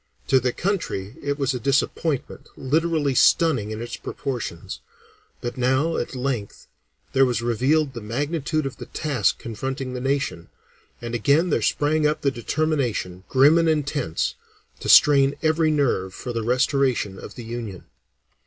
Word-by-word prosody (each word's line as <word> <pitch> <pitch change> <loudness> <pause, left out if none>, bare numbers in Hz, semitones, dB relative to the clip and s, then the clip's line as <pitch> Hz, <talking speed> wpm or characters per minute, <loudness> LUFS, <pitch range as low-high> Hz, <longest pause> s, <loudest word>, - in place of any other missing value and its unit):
To 130 - +5
the 125 0 0
country 140 - -2
it 145 0 -2
was 135 -2 0
a 125 - -3
disappointment 140 +2 -1
literally 155 0 +1
stunning 130 -6 +3
in 110 +1 -5
its 120 - -6
proportions; 120 -11 -5 0.6
but 120 +2 -5
now 130 +6 +2
at - - -3
length 125 -5 -3 0.5
there 135 - +5
was 120 -3 +1
revealed 135 +5 +1
the 115 - -7
magnitude 145 +7 -2
of 135 -2 -5
the - - -9
task 135 -9 0
confronting 130 +3 -5
the 125 - -4
nation, 135 -11 -2 0.5
and 120 0 -5
again 145 - +2
there 115 - +2
sprang 150 +6 +2
up 150 - -1
the 140 - +2
determination, 120 - -2
grim 145 +5 +5
and 165 -1 +2
intense, 145 - -1 0.5
to - - -5
strain 140 -1 +6
every 160 0 +3
nerve 125 -11 0
for 125 -1 -6
the 115 - -2
restoration 125 -4 +1
of - - -10
the 120 - -8
Union. 115 -5 -6
135 Hz, 155 wpm, -23 LUFS, 120-150 Hz, 0.6 s, strain